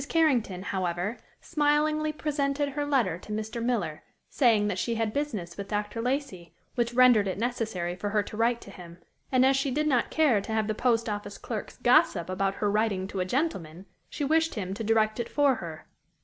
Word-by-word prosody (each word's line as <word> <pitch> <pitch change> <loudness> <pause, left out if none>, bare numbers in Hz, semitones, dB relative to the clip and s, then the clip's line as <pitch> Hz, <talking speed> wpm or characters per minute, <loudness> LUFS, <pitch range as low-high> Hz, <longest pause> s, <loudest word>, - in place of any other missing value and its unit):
Carrington, 245 - +2
however, 185 +2 -2 0.2
smilingly 305 0 +1
presented 290 -1 -1
her 290 +1 -3
letter 235 - +1
to 210 - -11
Mr. 220 +2 -3
Miller, 215 -11 -1 0.3
saying 225 -6 +3
that 195 -3 -2
she 235 +3 -1
had 225 -1 -1
business 215 -13 -3
with 200 -1 -5
Dr. 210 +2 -3
Lacey, 250 - -3 0.2
which 240 -1 -1
rendered 245 -5 +6
it 185 - -2
necessary 215 -7 -2
for 205 +3 -3
her 210 0 +1
to 205 - -9
write 235 +2 +1
to 200 - -11
him, 170 -3 -12 0.3
and 255 -1 +4
as 270 +1 +4
she 275 +1 0
did 300 +4 0
not 255 -6 +2
care 285 -10 +3
to 210 - -7
have 220 -1 +1
the 215 - -1
post 230 0 +1
office 205 -1 -4
clerks 220 -4 -6
gossip 225 -8 +3
about 195 +1 0
her 205 -1 0
writing 205 -3 0
to 195 - -4
a 180 - 0
gentleman, 185 - -2 0.2
she 290 - -3
wished 320 +3 +2
him 190 -3 -3
to 225 - -5
direct 215 0 +2
it 235 - -3
for 285 -4 +3
her. 160 -2 -8
225 Hz, 200 wpm, -28 LUFS, 195-270 Hz, 0.3 s, rendered